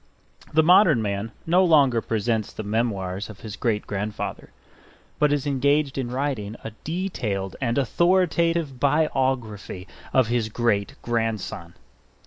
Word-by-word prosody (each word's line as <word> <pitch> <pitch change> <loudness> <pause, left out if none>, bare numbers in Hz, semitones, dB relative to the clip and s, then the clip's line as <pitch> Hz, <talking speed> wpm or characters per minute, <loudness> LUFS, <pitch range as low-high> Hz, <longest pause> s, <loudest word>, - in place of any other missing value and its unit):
The 160 +1 +4
modern 175 - +6
man 100 +2 -3
no 180 +3 +4
longer 140 -9 +4
presents 110 -1 -1
the 110 - -6
memoirs 100 -3 -2
of 100 -3 -11
his 110 -2 -7
great 110 -4 -1
grandfather; 105 +1 -4 0.7
but 150 -1 +3
is 145 -1 0
engaged 140 +1 +1
in 130 -3 -2
writing 125 -5 -2
a 115 - -5
detailed 115 - -3
and 120 -1 0
authoritative 170 -1 +2
biography 130 - 0 0.2
of 130 - +4
his 115 -1 -1
great 110 -3 0
grandson. 110 -7 -3
120 Hz, 125 wpm, -24 LUFS, 105-145 Hz, 0.7 s, modern